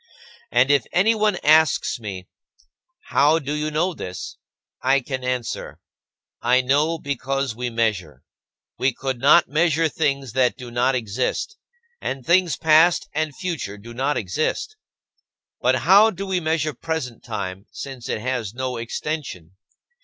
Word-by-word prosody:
And 125 +3 +4
if 140 -4 +2
anyone 210 +2 +3
asks 155 -4 +4
me, 95 -5 -7 0.9
"How 150 +3 +4
do 145 -2 -3
you 150 0 -1
know 170 +5 0
this?", 90 - -7 0.4
I 135 +2 +3
can 130 0 -5
answer: 125 -2 -3 0.6
"I 125 +2 +3
know 145 +6 +1
because 135 -3 -2
we 125 +1 -3
measure. 105 - -2 0.6
We 130 0 +2
could 130 -2 -3
not 145 +6 +6
measure 160 +1 +2
things 140 -6 -1
that 125 -2 +2
do 125 -2 -9
not 125 +2 +1
exist, 125 - -2 0.5
and 135 -2 -4
things 175 -4 +3
past 160 +2 +4
and 155 -2 -2
future 160 - -4
do 115 +3 -11
not 135 +3 0
exist." 140 - -2 0.9
But - - +3
how 205 +4 +7
do 195 -1 -5
we 190 -2 0
measure 155 -2 -1
present 135 -4 -4
time 100 -3 -5
since 130 -4 -8
it - - -2
has 120 -4 -3
no 130 -1 -3
extension? 115 - -5
135 Hz, 140 wpm, -22 LUFS, 120-155 Hz, 0.9 s, how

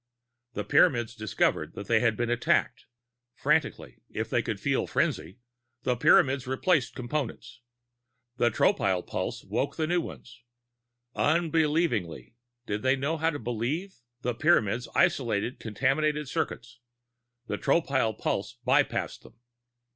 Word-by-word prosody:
The 105 - -3
Pyramids 120 0 +3
discovered 110 -2 -1
that 100 - -6
they 110 +2 +3
had 115 -2 +1
been 120 0 -1
attacked. 120 - +1 0.5
Frantically - - -1
(if - - -4
they - - +2
felt - - -1
frenzy), 90 +7 -1 0.5
the 125 - +1
Pyramids 135 -1 +4
replaced 135 +2 +1
Components; 125 -2 -4 0.8
the 120 -1 +3
Tropile 95 -4 +1
pulse - - -4
woke - - -2
the 160 - 0
new 175 +2 +1
ones. 120 -6 -10 0.7
Unbelievingly 155 - 0 0.3
(did 105 -2 -3
they 130 +1 +3
know 140 +5 -1
how 160 +1 +1
to 150 - -3
"believe"?), 120 - -3 0.2
the 125 - 0
Pyramids 125 - +2
isolated 120 -1 +1
contaminated 140 +7 0
circuits; 120 -5 -4 0.7
the - - -4
Tropile 135 -7 +1
pulse - - -2
bypassed - - +1
them. - - -17
130 Hz, 125 wpm, -28 LUFS, 115-155 Hz, 0.8 s, Pyramids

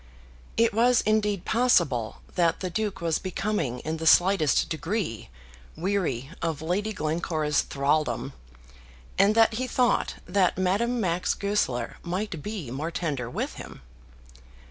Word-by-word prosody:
It 230 -1 +3
was 240 +2 +4
indeed 210 -3 +1
possible 145 - +2
that 170 -2 +1
the 185 -2 -3
Duke 205 -1 -2
was 165 -2 0
becoming 185 - -2
in 160 +1 -3
the 160 0 -2
slightest 180 -3 +4
degree 165 - -3 0.5
weary 165 -8 -1
of 165 -3 -1
Lady 185 +7 -1
Glencora's 155 -3 0
thraldom, 145 +2 -1 0.9
and 200 +2 +5
that 225 0 +5
he 255 +3 -2
thought 250 -1 +1
that 180 -1 +2
Madame 205 +7 +1
Max 180 -3 0
Goesler 200 -12 -1
might 180 -2 -3
be 195 - -5
more 145 +6 -3
tender 145 -8 -3
with - - -3
him. - - -10
180 Hz, 130 wpm, -26 LUFS, 155-210 Hz, 0.9 s, and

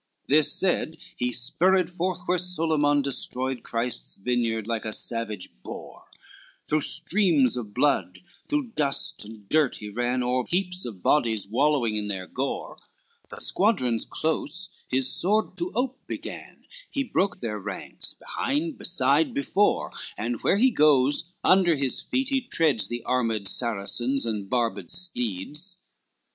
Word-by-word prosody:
XLVIII 140 - +4
This 155 - 0
said, 175 -3 +1 0.2
he 125 0 -1
spurred 170 +9 +2
forth 180 +1 -2
where 180 0 +2
Solyman 155 -5 +2
Destroyed 130 -1 -2
Christ's 120 +1 -1
vineyard 115 0 0
like 115 -1 -1
a 110 - -3
savage 110 -5 -2
boar, - - -9 0.6
Through 155 0 +2
streams 165 - +3
of 110 -5 -6
blood, 95 -10 +2 0.3
through 290 -5 -1
dust 140 -7 0
and 105 -1 -12
dirt 150 -1 +3
he 105 - -7
ran, 120 +3 0
O'er 125 0 0
heaps 180 0 -1
of 105 -7 -8
bodies 110 -9 +2
wallowing 125 -1 +2
in 105 -1 -2
their 95 -2 -4
gore, - - -4 0.5
The - - -9
squadrons 130 - +2
close 160 +3 -1 0.2
his 130 0 +1
sword 210 +10 +1
to 350 +1 -2
ope 255 +1 -1
began, - - -7 0.2
He 275 - -1
broke 195 -7 0
their 105 -3 -3
ranks, 100 -1 -6
behind, 290 +1 -2
beside, 145 -1 +2
before, 190 +9 +2 0.3
And, 115 +2 -2
where 195 - +3
he 255 +4 +5
goes, 145 - +4 0.2
under 185 -3 +5
his 135 -2 -1
feet 265 0 -1
he 270 -1 +2
treads 160 - +2
The 120 0 -4
armed 115 -5 0
Saracens, 120 +4 0
and 105 -4 -3
barbed 115 -7 0
steeds. 155 - -2
135 Hz, 145 wpm, -26 LUFS, 115-180 Hz, 0.6 s, he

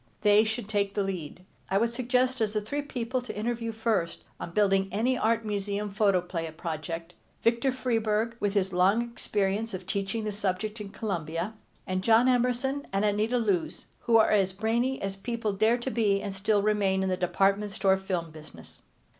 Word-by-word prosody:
They 210 +1 +6
should 220 0 -3
take 200 -2 0
the 205 - +1
lead. 180 -2 -5 0.2
I 195 - +2
would 230 +3 +2
suggest 250 +1 +1
as 215 -1 +1
the 215 - 0
three 285 +8 -3
people 255 -3 -3
to 245 - -7
interview 230 +1 -2
first 220 -6 -1 0.2
on - - -5
building 195 +1 +2
any 235 +6 +1
Art 230 -1 +1
Museum 205 0 -2
Photoplay 180 -5 +1
project: 165 +1 -5 0.3
Victor 235 +3 +3
Freeburg, 225 -3 0
with 205 0 -1
his 190 -2 +1
long 195 +6 +4
experience 215 -2 -2
of 185 -1 -8
teaching 200 +3 -2
the 210 - -2
subject 205 +2 -2
in 205 - -6
Columbia, 175 -2 -3 0.3
and 185 -1 -1
John 230 +3 +5
Emerson 250 +3 +1
and 195 +2 +1
Anita 210 +4 +1
Loos, 200 -8 -1
who 230 -1 +4
are 220 - +4
as 195 -3 +3
brainy 235 +6 0
as 195 0 -2
people 230 0 -2
dare 220 +4 +3
to 245 +2 -4
be 205 -4 +2
and 200 -1 -4
still 205 +1 +1
remain 200 -2 +2
in 190 - 0
the 185 - +1
department 195 +3 +1
store 195 -1 +3
film 180 -4 -3
business. 150 - -13
210 Hz, 180 wpm, -28 LUFS, 190-230 Hz, 0.3 s, They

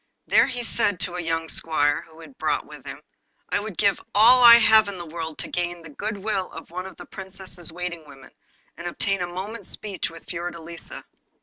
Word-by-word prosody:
There - - +5
he 245 -1 -3
said 205 -5 +1
to 175 - +1
a 180 - -3
young 165 -1 -1
squire 145 -3 +1
whom 160 0 -16
he - - -10
had 270 - -17
brought - - 0
with - - -12
him: - - -8 0.5
'I - - +1
would 205 -3 -7
give 200 -2 +2
all 240 +5 +7
I 235 -1 +12
have 220 -2 +6
in 200 -2 -5
the 175 - -7
world 160 -1 -6
to - - -3
gain 175 -1 -3
the 165 - -11
good 205 +7 -4
will 195 -2 -2
of 165 - -10
one 180 +2 -5
of 190 - -12
the - - -10
Princess's 190 -3 -4
waiting 170 -2 -6
women, 135 -2 -14 0.5
and 170 - -6
obtain 195 +2 0
a 175 - -1
moment's 190 +6 -6
speech 200 -3 -4
with 165 0 -12
Fiordelisa. 170 -1 -6
180 Hz, 215 wpm, -24 LUFS, 165-205 Hz, 0.5 s, I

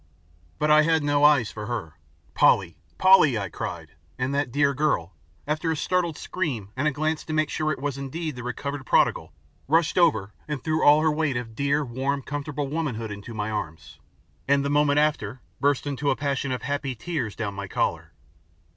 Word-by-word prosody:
But 150 - +1
I 155 0 +7
had 160 0 +2
no 145 0 +2
eyes 145 -7 +5
for 105 -1 -7
her. 110 -10 -4 0.4
"Polly! - - +3 0.2
Polly!" 185 -10 +6
I 100 -2 -3
cried, - - -6 0.3
and 130 +2 -1
that 140 -3 0
dear 140 +1 +2
girl, 135 - 0 0.3
after 155 +2 -1
a 160 - 0
startled 175 -1 0
scream 130 - -3
and 140 +4 0
a - - +2
glance 155 +2 -1
to 155 - -4
make 155 -1 +1
sure 155 0 0
it - - -2
was 140 0 -3
indeed 155 +2 -4
the 125 - -7
recovered 135 +3 -4
prodigal, - - +2 0.4
rushed 165 +4 +2
over 110 - +2
and 150 -4 -4
threw 155 0 0
all 150 +1 +7
her 160 0 +3
weight 150 -4 0
of 115 -2 -6
dear, 140 +4 0
warm, 135 +3 -2
comfortable 145 0 -4
womanhood 135 -8 -3
into 100 +3 -8
my 105 0 -2
arms, 80 -8 -6 0.5
and 140 0 +3
the 140 - 0
moment 145 0 +3
after 145 -6 0 0.2
burst 140 -1 +1
into 145 0 -1
a - - +2
passion 140 -2 -2
of 130 - -3
happy 140 -2 -2
tears 125 -6 -4
down 105 -3 -3
my 100 0 -6
collar. - - -2
140 Hz, 190 wpm, -25 LUFS, 120-155 Hz, 0.5 s, I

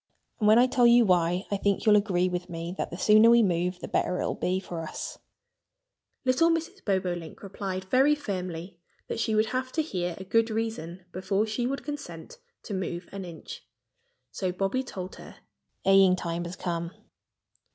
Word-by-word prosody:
And 210 - +2
when 215 +1 +7
I 245 - +7
tell 250 -1 +4
you 235 0 +6
why, 180 0 +2
I 200 - +1
think 200 +2 0
you'll 215 -1 +6
agree 190 -4 +2
with 180 0 -4
me 170 +1 -5
that - - -3
the 175 - -7
sooner 215 +3 +6
we 235 0 +6
move 180 -1 0
the - - -7
better 180 - 0
it - - -1
will - - -1
be 185 +1 -1
for 175 -3 -6
us." 160 - -6 1.1
Little 260 +6 +4
Mrs. 335 +4 -2
Bobolink 180 -5 -2
replied 190 -1 -4
very 265 +9 +3
firmly 180 - -5 0.3
that - - -4
she 220 -1 0
would 215 +1 +3
have 255 +3 -3
to 315 - +1
hear 180 - -3
a 190 - -7
good 225 +4 +2
reason 190 -6 -4
before 190 +3 0
she 225 +3 -2
would 275 +2 -3
consent 275 - -8 0.2
to 210 - -6
move 180 -2 -4
an 195 -1 -6
inch. 320 - -9 0.7
So 185 -2 -2
Bobby 195 +7 -1
told 190 -7 -7
her. - - -12 0.5
"Haying 195 -1 +6
time 170 -1 -3
has 170 +1 -6
come!" 170 -2 -3
195 Hz, 185 wpm, -27 LUFS, 180-230 Hz, 1.1 s, when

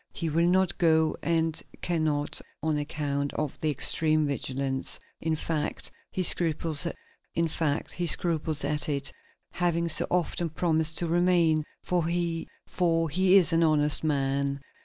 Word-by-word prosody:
He 170 -6 -3
will 170 +3 +2
not 185 0 +1
go 160 -2 +3
and 165 0 0 0.2
can 170 -3 0
not, 145 -1 -1 0.2
on 155 -1 0
account 145 -1 -3
of 150 -3 -4
the 155 - -1
extreme 155 +2 +2
vigilance. 135 -1 -2 0.2
In 160 -1 -1
fact, 155 -1 -3 0.2
he 185 - -2
scruples 165 -2 +3
at - - -4 1.9
it, 140 -1 +1 0.4
having 170 -1 0
so 155 - +4
often 175 -1 -1
promised 160 -1 0
to 175 - -1
remain, 170 -2 +2 0.2
for 175 -3 -1
he 170 -1 -2 0.5
is 180 +3 +3
an 165 - +3
honest 150 -2 +3
man.... 140 -2 -1
160 Hz, 125 wpm, -27 LUFS, 150-170 Hz, 1.9 s, so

